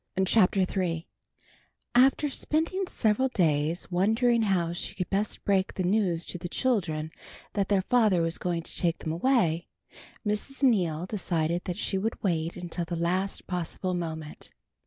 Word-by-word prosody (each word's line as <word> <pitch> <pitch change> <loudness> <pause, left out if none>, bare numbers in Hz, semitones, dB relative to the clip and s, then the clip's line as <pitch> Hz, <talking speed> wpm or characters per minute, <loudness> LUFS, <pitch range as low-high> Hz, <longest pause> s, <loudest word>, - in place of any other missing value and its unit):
CHAPTER 195 -1 +4
III 180 -3 -1 0.9
AFTER 270 +4 +4
spending 330 +7 -1
several 220 0 +1
days 165 - 0
wondering 225 +6 +3
how 180 -5 +1
she 175 - -3
could 180 - -4
best 200 +2 -1
break 195 -1 +1
the 185 - -1
news 180 -3 +1
to 180 - -6
the 175 0 -5
children 170 - 0 0.4
that 200 -2 0
their 195 -2 +3
father 210 -7 +3
was 165 +1 0
going 170 -2 -2
to - - -6
take 170 -2 +1
them 155 - -4
away, 170 -3 +1 0.6
Mrs. 210 +7 -2
Neal 180 - +2
decided 175 -4 -1
that 180 -1 -3
she 195 -3 -1
would 225 +3 -3
wait 165 -3 0
until 175 -1 -3
the 170 +1 -4
last 180 +4 -1
possible 180 +1 -3
moment. 160 -3 -5
185 Hz, 155 wpm, -28 LUFS, 170-215 Hz, 0.9 s, CHAPTER